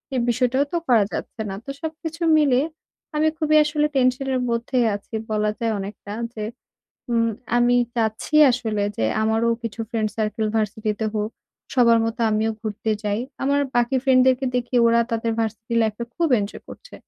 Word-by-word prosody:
এই - - +2
বিষয়টাও 250 +3 +2
তো - - +2
করা 230 -4 +5
যাচ্ছে 225 - -5
না। 195 - -4
তো - - -9
সবকিছু 320 +1 -6 0.2
মিলিয়ে 275 -2 +3 0.5
আমি 305 +1 +3
খুবই 310 -1 +2
আসলে 300 0 0
টেনশনের 260 0 +1
মধ্যেই 235 +1 0
আছি 205 - -11 0.2
বলা 210 0 +1
যায় 230 -1 0
অনেকটা। 200 +1 -7 0.2
যে 215 - -5 0.7
উম 230 -1 +2 0.3
আমি 245 0 +4 0.2
চাচ্ছি 225 +4 -2 0.2
আসলে 225 -4 -1
যে - - 0 0.2
আমারও 220 +1 +2
কিছু 230 -1 -5
ফ্রেন্ড-সার্কেল 215 -1 -1
ভার্সিটিতে 215 0 -1
হোক। 210 0 -1 0.4
সবার 235 -3 +5
মতো 225 +2 -3
আমিও 215 +1 +1
ঘুরতে 215 0 -3
যাই। 210 +1 -1 0.2
আমার 280 +1 +2 0.2
বাকি 240 +2 +2
ফ্রেন্ডদেরকে 260 0 +4
দেখি 245 +1 -3
ওরা 230 0 +4
তাদের 230 0 -1
ভার্সিটি 225 +1 -3
লাইফে 220 +1 -1
খুব 335 -1 +1
এনজয় 200 0 -6
করছে। - - -12
235 Hz, 160 wpm, -23 LUFS, 220-260 Hz, 0.7 s, করা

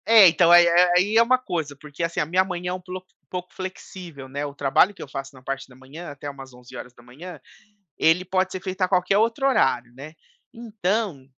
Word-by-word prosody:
É, 220 -4 +8
então 170 0 +4
aí 175 0 +8
é 175 +1 +4
aì 205 +5 +2
é - - +7
uma 255 +2 +3
coisa, 170 - -4
porque 145 +2 -8
assim, 165 0 -2
a - - +1
minha 180 +4 +2
manhã 180 -1 -5
é - - -2
um 185 - -6
ploc 185 0 -8 0.2
pouco 180 0 -7
flexível, 180 -6 -9
né, 140 +2 -4
o 140 - -7
trabalho 145 +8 +2
que - - -14
eu - - -7
faço 135 0 -7
na 130 - -15
parte 135 +1 -5
da 125 - -17
manhã, 140 +7 -11
até 145 0 -8
umas 135 -2 -11
11h, 125 +6 -12 0.6
ele 165 +3 +3
pode 185 0 0
ser 185 - -6
feito 190 0 -6
a 185 - +3
qualquer 185 +1 +1
outro 230 +5 +1
horário, 125 - +1
né. 145 +4 -10 0.4
Então, 210 - -3
175 Hz, 215 wpm, -23 LUFS, 140-185 Hz, 0.6 s, É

